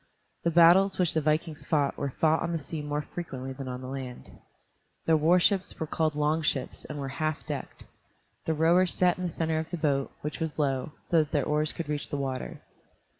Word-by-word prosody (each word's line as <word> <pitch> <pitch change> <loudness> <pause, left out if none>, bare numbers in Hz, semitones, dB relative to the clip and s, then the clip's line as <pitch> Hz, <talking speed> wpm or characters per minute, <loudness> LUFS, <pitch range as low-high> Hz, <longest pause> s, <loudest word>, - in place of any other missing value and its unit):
The 170 - +3
battles 175 +4 +6
which 180 -3 +2
the 160 - +1
vikings 155 +1 0
fought 145 -3 +1
were 140 - -2
fought 160 +4 +2
on 170 - -1
the - - +1
sea 155 +1 -5
more 150 0 -2
frequently 135 -6 -6
than 135 0 -7
on 125 0 -5
the 130 - -7
land. 130 -2 -7 0.7
Their 165 - +4
warships 180 +5 +3
were 160 - -1
called 155 -1 0
long 150 +2 +1
ships 150 - -1
and - - -6
were 140 -1 -4
half 155 -1 -1
decked 145 -4 -6 0.6
The 160 - 0
rowers 170 +3 +4
sat 180 -1 +3
in 180 - -2
the - - -1
center 160 -1 -1
of 160 +1 -4
the 175 - -3
boat, 140 -3 0
which 150 -1 -4
was 160 -2 -3
low, 140 -1 0
so 170 - +2
that 155 -1 0
their 145 -5 +1
oars 150 0 +1
could 170 - -5
reach 150 -1 -3
the 145 - -2
water. 135 -2 -4
155 Hz, 215 wpm, -28 LUFS, 145-165 Hz, 0.7 s, battles